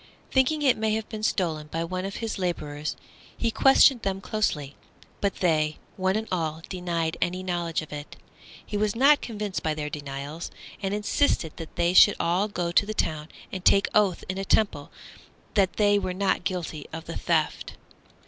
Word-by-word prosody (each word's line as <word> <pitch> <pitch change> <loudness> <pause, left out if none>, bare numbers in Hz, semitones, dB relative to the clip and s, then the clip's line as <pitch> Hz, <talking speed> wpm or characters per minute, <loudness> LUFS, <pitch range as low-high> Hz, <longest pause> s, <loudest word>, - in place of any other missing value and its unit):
Thinking 285 +3 +2
it 260 -5 +4
may 215 0 +1
have 220 -1 -3
been 215 -2 -6
stolen 165 -8 -1
by 165 +2 -3
one 185 +2 -3
of 195 - -5
his 225 -3 -4
labourers, 150 -5 -3 0.4
he 230 - 0
questioned 270 0 +6
them 195 -2 -2
closely, 150 -10 -2 0.4
but 200 -2 -2
they 155 -3 +2 0.2
one 190 0 +1
and 220 +1 -2
all 160 -3 -2
denied 170 -3 -2
any 185 +1 -1
knowledge 175 -3 -1
of 155 - -10
it. 145 0 -7 0.5
He 210 - -3
was 210 0 0
not 280 +4 +5
convinced 210 -4 -4
by 155 -1 -1
their 150 -1 -4
denials, 145 +2 -6 0.3
and 195 0 -1
insisted 210 - +1
that 165 - -9
they 170 +1 +2
should 205 +2 +8
all 180 +5 +1
go 175 -4 -2
to 185 - +4
the 215 - -4
town 155 -4 -1 0.2
and 185 -2 -5
take 200 +1 +5
oath 200 -4 +3
in 185 +1 -3
a - - -2
temple 195 -8 +1 0.6
that 195 -3 +3
they 205 -1 +3
were 185 -2 -3
not 190 -2 0
guilty 170 -5 -3
of 160 +1 -7
the 165 - -6
theft. 160 -3 0
185 Hz, 185 wpm, -26 LUFS, 160-210 Hz, 0.6 s, should